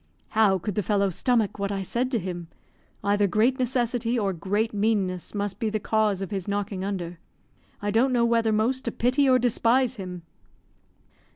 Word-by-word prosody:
"How 215 Hz, -3 st, +3 dB
could 195 Hz, +3 st, -4 dB
the 210 Hz, -, 0 dB
fellow 200 Hz, 0 st, +1 dB
stomach 220 Hz, +2 st, +1 dB
what 200 Hz, 0 st, -1 dB
I 195 Hz, -1 st, -2 dB
said 240 Hz, +7 st, -1 dB
to 255 Hz, -, 0 dB
him? 175 Hz, -4 st, -5 dB, 0.6 s
Either 205 Hz, 0 st, +2 dB
great 225 Hz, +8 st, +2 dB
necessity 245 Hz, -1 st, 0 dB
or 200 Hz, -4 st, 0 dB
great 205 Hz, +6 st, -1 dB
meanness 200 Hz, -4 st, -1 dB
must 205 Hz, -1 st, -2 dB
be 225 Hz, -2 st, 0 dB
the 215 Hz, 0 st, -1 dB
cause 210 Hz, -2 st, +1 dB
of 195 Hz, -, -7 dB
his 195 Hz, -3 st, -3 dB
knocking 200 Hz, -1 st, -2 dB
under. 180 Hz, -4 st, -4 dB, 0.6 s
I 205 Hz, -, 0 dB
don't 240 Hz, +5 st, +3 dB
know 240 Hz, -2 st, +3 dB
whether 230 Hz, -1 st, +2 dB
most 235 Hz, +5 st, +1 dB
to 235 Hz, -, -1 dB
pity 260 Hz, +5 st, +2 dB
or 255 Hz, -, +6 dB
despise 245 Hz, +1 st, +2 dB
him." 180 Hz, -3 st, -7 dB
210 Hz, 180 wpm, -25 LUFS, 195-235 Hz, 0.6 s, or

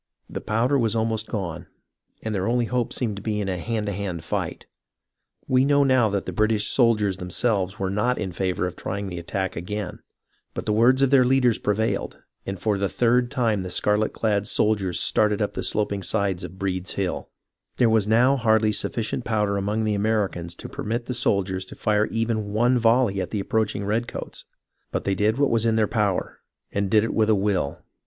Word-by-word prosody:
The -, -, -6 dB
powder 120 Hz, +6 st, +1 dB
was 115 Hz, -1 st, +1 dB
almost 110 Hz, -1 st, 0 dB
gone, 90 Hz, -8 st, -4 dB, 0.6 s
and 110 Hz, -, -2 dB
their 95 Hz, -2 st, -1 dB
only 120 Hz, 0 st, +1 dB
hope 120 Hz, 0 st, -1 dB
seemed 110 Hz, -5 st, -2 dB
to -, -, -6 dB
be 105 Hz, 0 st, -2 dB
in 100 Hz, -, -2 dB
a 90 Hz, -2 st, -2 dB
hand 110 Hz, +2 st, -2 dB
to 100 Hz, -, -2 dB
hand 90 Hz, -4 st, -4 dB
fight. -, -, -3 dB, 0.8 s
We 130 Hz, 0 st, +3 dB
now 140 Hz, +1 st, +4 dB
know 130 Hz, -5 st, +3 dB
that 100 Hz, -1 st, -2 dB
the -, -, -5 dB
British 110 Hz, -1 st, +1 dB
soldiers 105 Hz, -7 st, +2 dB
themselves 95 Hz, +2 st, 0 dB
were 95 Hz, -1 st, -2 dB
not 120 Hz, +5 st, +1 dB
in 95 Hz, -3 st, -3 dB
favour 90 Hz, +1 st, -1 dB
of 90 Hz, -1 st, -4 dB
trying 100 Hz, +1 st, -4 dB
the 90 Hz, -1 st, -5 dB
attack 95 Hz, +2 st, -3 dB
again; 95 Hz, +2 st, -5 dB, 0.6 s
but -, -, -4 dB
the 105 Hz, -, +1 dB
words 125 Hz, +5 st, +4 dB
of 135 Hz, -, +3 dB
the 135 Hz, -2 st, +6 dB
leaders 125 Hz, -2 st, +3 dB
prevailed, 105 Hz, +2 st, -1 dB, 0.3 s
and 95 Hz, 0 st, -3 dB
for 105 Hz, -1 st, 0 dB
the 100 Hz, -1 st, 0 dB
third 120 Hz, 0 st, +2 dB
time 115 Hz, -7 st, 0 dB
the 90 Hz, -, -5 dB
scarlet 105 Hz, +4 st, +1 dB
clad 105 Hz, -2 st, 0 dB
soldiers 100 Hz, -5 st, +1 dB
started 105 Hz, -1 st, +2 dB
up 105 Hz, -, -1 dB
the -, -, -3 dB
sloping 100 Hz, -2 st, 0 dB
sides 100 Hz, -2 st, 0 dB
of 95 Hz, -, -8 dB
Breed's 95 Hz, -1 st, -2 dB
Hill. 95 Hz, -2 st, -1 dB
BUNKER -, -, -3 dB
HILL -, -, -19 dB
6^ -, -, -43 dB
There 120 Hz, -, +4 dB
was 110 Hz, -2 st, +3 dB
now 125 Hz, +5 st, +4 dB
hardly 110 Hz, -3 st, +3 dB
sufficient 115 Hz, +3 st, -2 dB
powder 105 Hz, -3 st, 0 dB
among 105 Hz, +3 st, -1 dB
the 110 Hz, -1 st, +1 dB
Americans 100 Hz, -5 st, -1 dB
to -, -, -9 dB
permit 115 Hz, +2 st, -3 dB
the 125 Hz, -, -3 dB
soldiers 100 Hz, -6 st, 0 dB
to -, -, -11 dB
fire 105 Hz, 0 st, +1 dB
even 110 Hz, -2 st, -2 dB
one 120 Hz, +3 st, +3 dB
volley 115 Hz, -4 st, +3 dB
at -, -, -4 dB
the 105 Hz, -, -2 dB
approaching 105 Hz, 0 st, -1 dB
redcoats, 115 Hz, +4 st, -3 dB, 0.4 s
but -, -, -3 dB
they 100 Hz, -, 0 dB
did 105 Hz, +4 st, +1 dB
what 140 Hz, 0 st, +2 dB
was 115 Hz, 0 st, +2 dB
in 110 Hz, -, +2 dB
their 110 Hz, -1 st, +3 dB
power, 105 Hz, -5 st, -1 dB, 0.3 s
and 100 Hz, -1 st, -1 dB
did 105 Hz, +1 st, +4 dB
it 115 Hz, -, -2 dB
with 110 Hz, -1 st, +2 dB
a 110 Hz, -, +5 dB
will. 95 Hz, -7 st, -1 dB
105 Hz, 210 wpm, -24 LUFS, 100-115 Hz, 0.8 s, the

